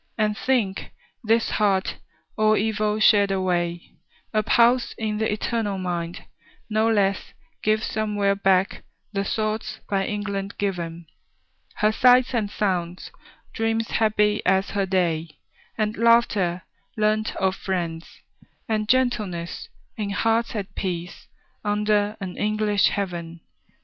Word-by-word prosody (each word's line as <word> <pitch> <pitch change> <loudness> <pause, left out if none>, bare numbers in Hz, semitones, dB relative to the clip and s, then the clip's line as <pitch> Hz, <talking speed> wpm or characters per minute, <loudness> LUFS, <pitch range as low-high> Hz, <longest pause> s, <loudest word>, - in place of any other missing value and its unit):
And 210 -1 +1
think, 220 -6 -1 0.3
this 225 +1 +2
heart, 195 -3 +1 0.4
all 215 0 +3
evil 215 0 0
shed 205 -2 +5
away, 175 -3 -2 0.4
A 215 - +3
pulse 240 +3 +3
in 215 -1 -2
the 220 - 0
eternal 210 -1 -1
mind, 175 -2 -4 0.5
no 220 +1 +2
less 200 -3 0 0.3
Gives 215 +1 +1
somewhere 205 -2 0
back 195 -1 +1 0.3
the 195 0 0
thoughts 215 +1 -2
by 195 -1 0
England 200 -1 -4
given; 170 -4 -3 0.7
Her 215 +1 +2
sights 250 +3 +5
and 220 -4 0
sounds; 180 -4 -2 0.4
dreams 225 0 -1
happy 210 -1 +2
as 190 +1 +2
her 200 -1 0
day; 165 -4 -1 0.4
And 215 0 0
laughter, 210 -7 +3 0.3
learnt 215 0 +1
of 190 0 0
friends; 170 -4 -3 0.6
and 215 -2 -1
gentleness, 210 -10 0 0.3
In 210 -2 -2
hearts 225 +3 0
at 205 -2 -4
peace, 175 -2 -5 0.4
under 210 0 +1
an 185 -3 -6
English 210 -1 +2
heaven. 170 -4 -4
205 Hz, 120 wpm, -24 LUFS, 190-215 Hz, 0.7 s, shed